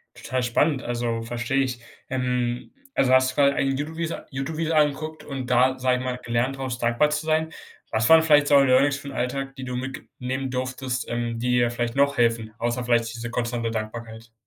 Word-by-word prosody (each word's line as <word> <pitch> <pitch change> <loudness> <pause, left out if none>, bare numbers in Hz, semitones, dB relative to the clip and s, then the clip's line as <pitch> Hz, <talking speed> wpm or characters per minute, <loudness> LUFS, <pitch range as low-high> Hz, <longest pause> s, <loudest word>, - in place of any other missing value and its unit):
Total 130 -1 -3
spannend, 135 +3 +1
also, 120 -1 -2
versteh 120 +2 -3
ich. 125 -2 -4 0.3
Ähm, 125 -2 -1 0.2
also 130 - +2
hast 130 0 +5
du - - -15
quasi 140 -1 +4
eigentlich 135 0 0
YouTube-Videos 160 +2 -3
YouTube-Videos 155 +4 -2
angeguckt 155 +1 0
und 135 -3 -5
da, 130 +1 +3
sag 125 0 +2
ich 125 - -4
mal, 125 -1 -3
gelernt 120 +3 0
draus, 130 -2 -3
dankbar 120 +5 +2
zu 150 +1 -2
sein? 160 0 +1 0.4
Was 110 +1 +2
waren 160 0 +8
vielleicht 150 -2 +5
so 145 -1 +6
Learnings 135 +1 +4
für 140 - -10
'n - - -5
Alltag, 135 +2 -3
die 135 - -7
du 125 -1 -4
mitge 130 +1 -5 0.2
nehmen 130 +1 -3
durftest, 130 0 -3
ähm, 120 -1 -2
die 125 +2 -1
dir 120 -1 +3
vielleicht 120 0 -2
noch 140 0 +2
helfen, 115 -2 +1
außer 120 +1 -1
vielleicht 120 -1 +1
diese 115 0 -6
konstante 120 -1 -2
Dankbarkeit? 115 +1 -6
130 Hz, 200 wpm, -24 LUFS, 120-140 Hz, 0.4 s, waren